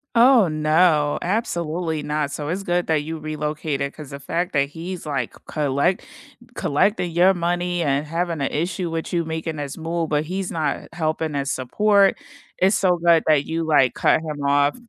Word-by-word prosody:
Oh, 235 -3 +6
no, 155 -1 +2
absolutely 170 -5 -2
not. 150 -1 -2
So 145 0 -5
it's 185 +4 -2
good 175 -1 0
that 155 -2 +1
you 160 +1 -5
relocated 150 -2 -3
'cause 150 -3 -10
the 140 - -8
fact 175 +6 -3
that 140 -2 +1
he's 170 +4 -7
like 135 -5 -3
c - - -17
collect 150 +5 0 0.5
collecting 175 +4 +1
your 180 +3 +4
money 175 0 -1
and 145 0 0
having 165 -1 -2
an 140 - +1
issue 175 +3 -2
with 165 +1 -4
you 170 -1 +1
making 160 0 -4
this 145 -2 -5
move, 165 0 -2
but 150 0 0
he's 185 +2 -3
not 155 -3 -2
helping 155 -2 -2
as 140 -1 -1
support, 200 +10 +2 0.4
it's 190 +3 +3
so 180 -2 +2
good 170 -1 +4
that 150 -2 +3
you, 165 +1 -2
like, 145 -6 +3
cut - - +3
him 150 -3 -5
off. 145 0 +3
160 Hz, 180 wpm, -22 LUFS, 150-175 Hz, 0.5 s, Oh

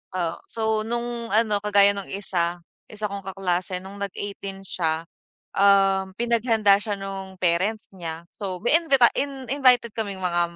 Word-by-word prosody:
Oh, 170 -3 -1
so 220 -1 0
nung 235 +1 -3
ano 215 -2 +3
kagaya 200 -1 +5
nung 200 -1 -6
isa, 175 -3 -1 0.3
isa 215 0 -9
kong 200 - -4
kaklase 185 -1 -2
nung 195 +1 -10
nag-eighteen 200 0 -5
siya, 160 -3 -1 0.5
um, 195 -1 +4
pinaghanda 230 -3 +3
siya 210 -1 -2
nung 195 -1 -6
parents 185 +6 +1
niya. 165 -2 -6
So 190 -3 -4
may 265 +7 +5
invita 275 -8 +5
in 275 -1 -2
invited 250 -4 +4
kaming 200 -4 -3
mga, 175 -1 +1
200 Hz, 150 wpm, -24 LUFS, 190-225 Hz, 0.5 s, kagaya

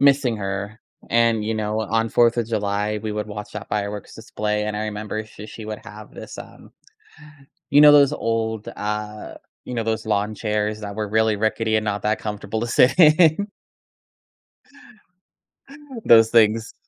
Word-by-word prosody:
missing 140 -4 +3
her. 100 +2 -5 0.3
And, 115 -2 +2
you 110 +1 -1
know, 110 0 -2
on 115 +1 0
fourth 120 +1 +3
of 115 - 0
July, 105 -1 -1
we 110 -1 -3
would 105 0 -3
watch 105 0 -8
that 105 - -7
fireworks 105 0 -4
display, 105 -1 -3
and 105 0 -3
I 105 - -2
remember 110 0 -4
she 105 0 -12
she 110 0 -10
would 110 -1 -6
have 105 +2 -12
this, - - -10
um, - - -12 1.0
you 145 +1 +6
know, 150 0 +9
those 145 -1 +6
old, 110 -4 -2
uh, 105 0 -5 0.3
you 125 - -6
know, 115 - -1
those 110 0 -2
lawn 105 0 0
chairs 105 0 -2
that 100 -1 -6
were 105 -1 -3
really 110 0 +2
rickety 110 +1 0
and 110 - -1
not 105 -2 -2
that 105 +1 0
comfortable 105 0 -4
to 120 - -2
sit 125 +6 +3
in? 165 +4 +5 2.6
Those 115 -1 +7
things. 115 -1 +3
110 Hz, 165 wpm, -22 LUFS, 105-115 Hz, 2.6 s, know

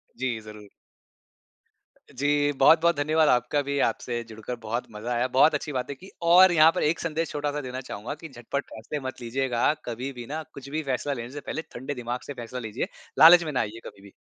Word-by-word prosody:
जी, 125 -3 -2
ज़रूर। 105 -1 -12 1.5
जी, 145 +2 +2
बहुत-बहुत 160 +4 +5
धन्यवाद 155 +1 +2
आपका 125 +4 +2
भी। 140 0 -3
आपसे 120 -1 -3
जुड़कर 110 +2 -6
बहुत 115 +3 -3
मज़ा 110 +3 -4
आया, 120 +2 +1
बहुत 135 +5 +4
अच्छी 150 +1 -3
बातें 130 +1 -3
की। 190 +7 -14
और 175 +2 +7
यहाँ 160 -1 +6
पर - - 0
एक 160 +2 +1
संदेश 165 0 -2
छोटा-सा 145 0 -2
देना 130 0 -5
चाहूँगा 120 +1 -6
कि 165 - -8
झटपट 135 +2 -4
फैसले 120 +7 -6
मत 130 - -7
लीजियेगा 125 +2 +1
कभी 125 +3 -4
भी 120 -1 -8
ना 155 +3 -4
कुछ 140 0 -10
भी 155 +2 -2
फैसला 140 +1 -1
लेने 120 -1 -6
से 145 - -6
पहले 160 - -4
ठंडे 130 +4 -5
दिमाग 120 0 -4
से 145 - -5
फैसला 125 0 -7
लीजिए। 110 0 -4 0.3
लालच 170 +1 +9
में 155 - -4
ना 130 - 0
आइए 110 +2 -3
कभी 100 - -11
भी। 100 -1 -14
135 Hz, 205 wpm, -26 LUFS, 120-150 Hz, 1.5 s, लालच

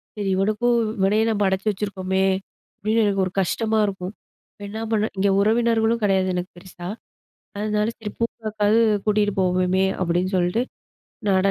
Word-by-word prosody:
சரி 200 -2 -2
இவனுக்கும் 215 +5 +1 0.2
இவனையும் 210 +4 +2
நம்ம 205 -2 +1
அடைச்சு 190 +2 -1
வச்சுருக்கோமே! 190 -1 -1 0.5
அப்பிடின்னு 220 +2 +1
எனக்கு 195 -2 +1
ஒரு 185 - -4
கஷ்டமா 220 +4 0
இருக்கும். 190 0 -4 0.5
என்ன 220 +2 -6
பண்ண 215 -1 +2
இங்க 200 +1 +2
உறவினர்களும் 225 +1 +2
கிடையாது 190 -2 +2
எனக்கு 180 +1 -3
பெருசா. 175 -1 -10 0.7
அதனால 210 0 0
சரி 210 -2 -5
பூங்காக்காவது 215 -1 +1 0.3
கூட்டிட்டு 205 -1 +2
போவோமே! 185 +1 +2 0.2
அப்பிடின்னு 180 +2 0
சொல்லிட்டு 180 +7 +1 0.7
நட 190 0 +3
205 Hz, 135 wpm, -23 LUFS, 190-215 Hz, 0.7 s, நட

